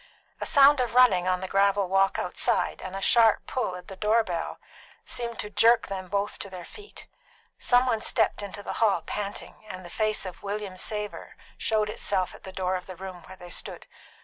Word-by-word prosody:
A - - -3
sound 285 -1 +6
of 245 -2 -1
running 200 -8 +5
on 185 0 +1
the 190 - -4
gravel 200 0 +2
walk 195 +1 +2
outside - - 0
and 185 0 -6
a 195 - -4
sharp 225 +1 +4
pull 245 -8 -2
at 180 0 -10
the 190 - -8
door 215 +4 +2
bell 170 -5 -4 0.5
seemed 235 -2 -4
to 210 - -5
jerk 225 +3 +4
them 190 -1 -5
both 200 +2 -2
to 200 - -6
their 180 -2 -8
feet. 415 0 -11 0.5
Some 245 0 +4
one 225 -4 0
stepped - - +1
into 205 0 -7
the - - -4
hall 200 -7 +3
panting, 205 +1 -6
and 185 0 -8
the 175 - -10
face 215 -2 0
of 185 - -8
William 205 -1 -4
Savor 210 +2 -5 0.2
showed 215 -1 0
itself 195 -3 -1
at - - -14
the 190 - -7
door 185 -1 -2
of 180 - -6
the 185 - -8
room 185 0 -8
where 190 - -11
they 175 -1 -11
stood. - - -5
200 Hz, 205 wpm, -27 LUFS, 185-220 Hz, 0.5 s, sound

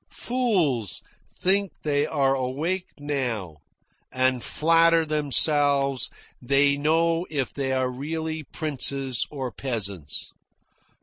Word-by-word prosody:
Fools 180 - 0 0.3
think 195 +1 +1
they 145 0 +1
are 135 -3 +2
awake 150 +8 -2
now, 125 - -3 0.5
and 130 -1 +1
flatter 165 +1 +3
themselves 145 -2 +2 0.3
they 140 +2 +3
know 165 +4 +1
if 140 -4 -2
they 135 -2 -2
are 130 -1 0
really 160 +4 -4
princes 140 -4 -2
or 135 -4 -4
peasants. 100 - -3
140 Hz, 100 wpm, -25 LUFS, 130-160 Hz, 0.5 s, flatter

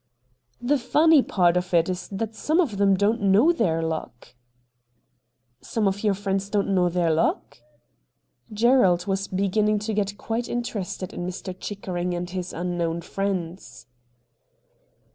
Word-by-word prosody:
' 120 -1 -46
The 290 -1 +3
funny 305 +4 +4
part 175 -7 +2
of 180 0 -1
it 170 0 +4
is 185 -1 -4
that 215 +2 -4
some 310 +9 0
of 260 - +1
them 195 -1 +3
don't 210 +4 +1
know 205 - +5
their 165 - 0
luck.' 160 -7 -5 0.7
' 125 - -47 0.5
Some 220 -3 -1
of 195 +2 -2
your 205 -2 +2
friends 195 0 -2
don't 200 -1 0
know 180 -2 +3
their 170 -1 +1
luck? 155 -5 -1 0.5
' 120 - -37
Gerald 195 -8 +4
was 195 0 -1
beginning 210 +3 +1
to 215 +2 -3
get 205 -1 -1
quite 230 +1 -3
in 240 0 -1
terested 190 -4 -5
in 175 - -4
Mr. 185 0 -6
Chickering 180 -3 -4
and 175 0 -4
his 180 -1 -4
unknown 170 -1 -2
friends. 185 -1 -4
195 Hz, 160 wpm, -24 LUFS, 175-210 Hz, 0.7 s, know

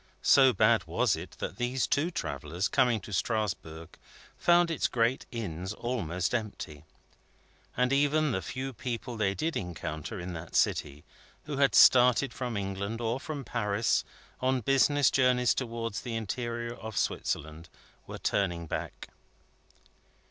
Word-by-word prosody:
So 135 -2 +6
bad 105 - +3
was - - +1
it - - -9
that - - -5
these 125 +1 0
two 155 +4 +1
travellers, 85 - -3
coming 120 -3 +2
to 100 - -9
Strasbourg, 90 -7 -3 0.4
found 175 -1 +4
its 160 - +1
great 120 +2 0
inns 95 -5 -5
almost 95 -7 -2
empty. 100 -10 -4 0.9
And 125 +2 +2
even 145 +1 +2
the 95 - -1
few 130 +5 -5
people 120 +1 -5
they 100 -3 0
did 160 +6 -2
encounter 85 +1 -5
in 90 +1 -5
that 80 0 -8
city, 75 +1 +1 0.4
who 145 -2 -5
had 140 -1 +3
started 125 0 +6
from 120 -4 -3
England 100 +3 -3
or 120 +2 -1
from 145 -1 -5
Paris 110 -2 0 0.4
on 130 0 +1
business 135 +3 +3
journeys 125 -2 +3
towards 115 -4 -3
the 120 -2 -5
interior 120 +1 -3
of 110 -2 -8
Switzerland, 80 +2 -2 0.4
were - - -7
turning 85 -4 -1
back. - - -5
115 Hz, 140 wpm, -29 LUFS, 95-130 Hz, 0.9 s, So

